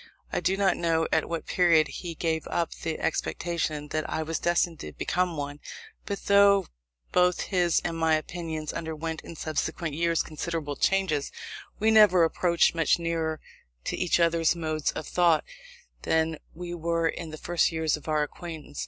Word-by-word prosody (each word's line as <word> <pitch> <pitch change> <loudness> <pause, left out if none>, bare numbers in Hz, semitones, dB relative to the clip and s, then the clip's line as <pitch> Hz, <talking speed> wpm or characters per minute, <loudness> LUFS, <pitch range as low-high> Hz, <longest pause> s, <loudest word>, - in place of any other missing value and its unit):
I - - +1
do 190 +1 +1
not 195 -2 +2
know 165 -1 +1
at 160 - +1
what 165 -1 -3
period 165 -4 +4
he 170 -2 -6
gave 160 -1 -1
up 170 -1 -1
the 160 -1 -4
expectation 155 -4 -2
that 155 0 -2
I 160 - -1
was 160 +1 -3
destined 175 -1 +1
to 75 - -7
become 180 -2 -1
one; 145 0 -5 0.5
but 200 -1 -4
though 200 -1 +5 0.5
both 180 0 +3
his 175 -3 +2
and 165 - -1
my 160 -1 +3
opinions 160 -1 -4
underwent 160 0 -4
in 170 - -10
subsequent 160 +1 -3
years 170 +1 +1
considerable 155 -2 -4
changes, 190 -7 +1 0.5
we 220 +1 +3
never 210 -5 +7
approached 170 +1 +3
much 165 -2 +2
nearer 165 -2 -2 0.4
to - - -2
each 180 -1 +1
other's 170 -1 +3
modes 155 -2 -1
of - - -5
thought 170 -3 +3 0.6
than 160 -1 +1 0.2
we 175 +1 -6
were 165 0 0
in 165 0 -4
the 155 - -7
first 175 +2 +1
years 160 -2 0
of 150 - -12
our 155 -1 +2
acquaintance. 155 -1 -8
165 Hz, 170 wpm, -27 LUFS, 155-175 Hz, 0.6 s, never